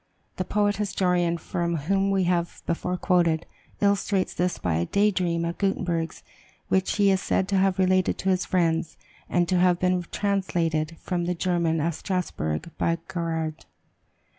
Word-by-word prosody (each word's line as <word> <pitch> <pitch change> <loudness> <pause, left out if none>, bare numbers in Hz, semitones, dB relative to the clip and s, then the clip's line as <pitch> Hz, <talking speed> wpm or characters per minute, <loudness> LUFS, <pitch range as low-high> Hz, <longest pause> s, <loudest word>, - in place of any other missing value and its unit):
The 185 - -1
poet 205 +1 +1
historian 180 -4 +1
from 170 +1 -2
whom 195 +6 +1
we 195 -1 +2
have 175 -1 -1
before 180 +2 -1
quoted, 170 -3 +2 0.4
illustrates 200 -1 +1
this 180 0 0
by 85 -3 -1 0.2
a 210 +1 +5
dream 170 -3 0
of 170 0 -4
Gutenberg's, 175 -4 -1 0.5
which 190 0 +1
he 200 -1 +4
is 190 0 +1
said 190 - 0
to 195 - +2
have 190 0 +2
related 185 -1 +2
to 190 - -1
his 185 -1 +2
friends, 165 -3 0 0.3
and 175 -1 +2
to 185 0 +2
have 180 -1 +3
been 180 -1 +1
translated 170 -6 0
from 175 -2 -2
the 180 +1 -1
German, 170 -2 +1
at 165 +3 0
Strasbourg, 165 - -3
by 165 - +2
Mr. - - -13
Garaud. 160 -2 -3
180 Hz, 165 wpm, -25 LUFS, 170-190 Hz, 0.5 s, a